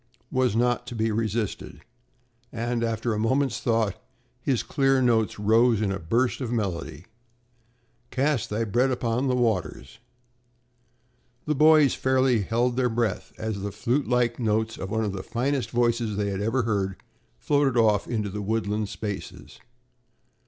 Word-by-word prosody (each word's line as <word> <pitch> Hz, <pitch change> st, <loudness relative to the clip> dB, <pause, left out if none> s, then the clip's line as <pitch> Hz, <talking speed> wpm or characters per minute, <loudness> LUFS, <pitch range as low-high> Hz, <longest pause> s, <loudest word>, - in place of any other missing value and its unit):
was 125 Hz, -4 st, +1 dB
not 120 Hz, +1 st, +1 dB
to 120 Hz, -, -6 dB
be 110 Hz, 0 st, 0 dB
resisted 110 Hz, -1 st, -3 dB, 0.7 s
and 120 Hz, 0 st, -2 dB
after 115 Hz, 0 st, -1 dB
a 105 Hz, -, -2 dB
moment's 130 Hz, +5 st, +1 dB
thought 115 Hz, -4 st, 0 dB, 0.4 s
his 130 Hz, -2 st, 0 dB
clear 135 Hz, -1 st, +2 dB
notes 115 Hz, -4 st, +2 dB
rose 110 Hz, +2 st, +3 dB
in 105 Hz, -2 st, 0 dB
a 95 Hz, -, -3 dB
burst 120 Hz, -, 0 dB
of 120 Hz, -3 st, -3 dB
melody: 90 Hz, -8 st, -3 dB, 1.0 s
"Cast 140 Hz, -1 st, 0 dB
thy 110 Hz, +2 st, -1 dB
bread 120 Hz, +5 st, +1 dB
upon 125 Hz, +1 st, -1 dB
the 130 Hz, -, +1 dB
waters" 110 Hz, -, -2 dB, 1.5 s
The 150 Hz, -, +1 dB
boys 150 Hz, -2 st, +5 dB
fairly 130 Hz, -3 st, +2 dB
held 120 Hz, +4 st, 0 dB
their 125 Hz, -1 st, +2 dB
breath 115 Hz, -3 st, -2 dB
as 110 Hz, -3 st, -4 dB
the 100 Hz, +1 st, -3 dB
flutelike 125 Hz, +1 st, 0 dB
notes 110 Hz, -1 st, 0 dB
of 95 Hz, -, -6 dB
one 110 Hz, +1 st, 0 dB
of 100 Hz, -, -2 dB
the 95 Hz, -, -4 dB
finest 125 Hz, +2 st, -2 dB
voices 120 Hz, -3 st, 0 dB
they 100 Hz, -1 st, -1 dB
had 95 Hz, 0 st, -3 dB
ever 115 Hz, +4 st, 0 dB
heard, 100 Hz, -4 st, -1 dB, 0.4 s
floated 140 Hz, -3 st, +1 dB
off 105 Hz, -3 st, +3 dB
into 105 Hz, -4 st, -2 dB
the 105 Hz, +2 st, -4 dB
woodland 105 Hz, 0 st, -1 dB
spaces. 105 Hz, -2 st, -7 dB
115 Hz, 150 wpm, -25 LUFS, 105-125 Hz, 1.5 s, boys